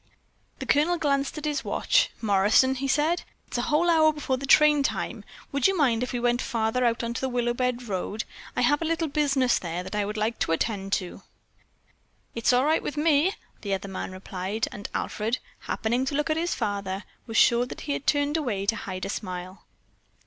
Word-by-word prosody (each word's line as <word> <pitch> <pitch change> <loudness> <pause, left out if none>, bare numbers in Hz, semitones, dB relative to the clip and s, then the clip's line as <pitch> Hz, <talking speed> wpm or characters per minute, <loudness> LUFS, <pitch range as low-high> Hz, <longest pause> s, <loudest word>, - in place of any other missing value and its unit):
The - - -6
Colonel 315 +5 +3
glanced 280 -2 0
at 305 - -5
his 300 -1 -1
watch. - - +2
"Morrison," 210 +5 +4
he 270 +1 -3
said, 305 +5 +2 0.3
"it's - - -3
a 240 - -2
whole 310 +3 +3
hour 320 -2 +5
before 295 -3 -2
train 295 +2 +5
time. 275 - -2 0.3
Would 280 -2 +3
you 385 -1 0
mind 245 -7 +2
if 250 - -2
we 245 - -2
went 240 +1 +1
farther 230 0 0
out 235 -1 +1
on 235 0 -2
the 265 +3 -2
Willowbend 245 0 -1
Road? 200 +2 -3 0.3
I - - +1
have 290 +1 +3
a - - -1
little 325 0 0
business 275 -4 +2
there 175 0 -4
that - - -8
I 210 0 +1
would 210 +1 -4
like 220 +2 -1
to 165 - +1
attend 195 +2 -2
to." 180 -3 -2 1.1
"It's 230 +1 +2
all 250 +2 +3
right 315 +2 +3
with 295 - -5
me," 310 +4 +3 0.3
the 200 -2 -1
other 195 +1 -6
man 190 - -5
replied, 190 +3 -3
and 205 - -7
Alfred, 225 +4 -1 0.2
happening 240 +4 -1
to 280 - -2
look 295 +2 0
at - - +2
his 340 +2 -1
father, 200 -3 -3 0.2
was 225 - -2
sure 240 0 +5
that - - -8
he 290 - -4
had 280 - -5
turned 290 +1 +2
away 220 -10 -2
to 225 - +1
hide 185 -4 -5
a - - -4
smile. 185 -2 -6
245 Hz, 205 wpm, -26 LUFS, 210-295 Hz, 1.1 s, hour